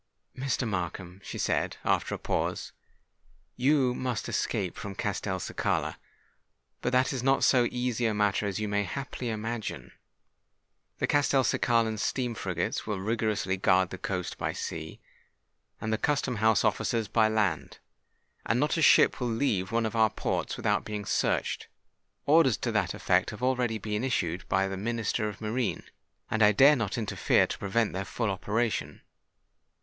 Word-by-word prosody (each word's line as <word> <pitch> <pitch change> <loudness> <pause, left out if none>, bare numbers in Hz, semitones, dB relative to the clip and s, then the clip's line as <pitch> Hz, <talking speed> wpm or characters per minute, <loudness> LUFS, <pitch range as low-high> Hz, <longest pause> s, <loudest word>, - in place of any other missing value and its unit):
"Mr. 130 -2 -1
Markham," 90 -1 -4
she - - -6
said, - - 0
after - - +1
a - - -5
pause, - - -2 0.8
"you 130 0 +3
must 125 -3 -3
escape - - -1
from 100 -1 -7
Castelcicala: 95 -2 -2 0.8
but 125 - -1
that 130 +1 +2
is 130 - -2
not 135 +2 +2
so 125 -2 +4
easy 125 -1 -1
a 110 - 0
matter 105 0 +1
as 100 0 -3
you 105 - -2
may 105 0 +1
haply 130 +3 -5
imagine. 110 0 -4 1.1
The - - 0
Castelcicalan 120 -5 +2
steam 125 +2 -1
frigates 90 -3 -3
will 105 -3 -2
rigorously 105 -2 -1
guard 95 -1 +3
the 95 - -6
coast 90 -2 -4
by - - -1
sea, 80 0 -6 0.8
and 110 0 -2
the 110 - 0
custom 135 -5 0
house 110 0 +3
officers 115 -2 0
by 110 +1 +3
land; 100 -11 -1 0.7
and 115 - +1
not 150 +4 +1
a - - +1
ship 155 - +5
will 125 - 0
leave 110 -6 0
one 115 0 +1
of 110 - -3
our 110 -1 +4
ports - - -2
without - - +1
being 105 -1 -5
searched. - - 0 0.6
Orders 145 -5 +5
to - - -2
that - - 0
effect - - +2
have - - -8
already 125 -3 +1
been 105 +1 -3
issued 95 -9 -1
by 95 +1 +2
the 95 0 -4
Minister 110 0 -1
of 100 - -9
Marine; 115 +2 -2 0.5
and 110 - 0
I 105 0 +6
dare 140 +7 +7
not 115 -5 -2
interfere 110 -3 +2
to - - -5
prevent 105 +2 0
their 95 - -2
full 110 +1 -2
operation. 110 +4 -2
110 Hz, 160 wpm, -28 LUFS, 100-125 Hz, 1.1 s, dare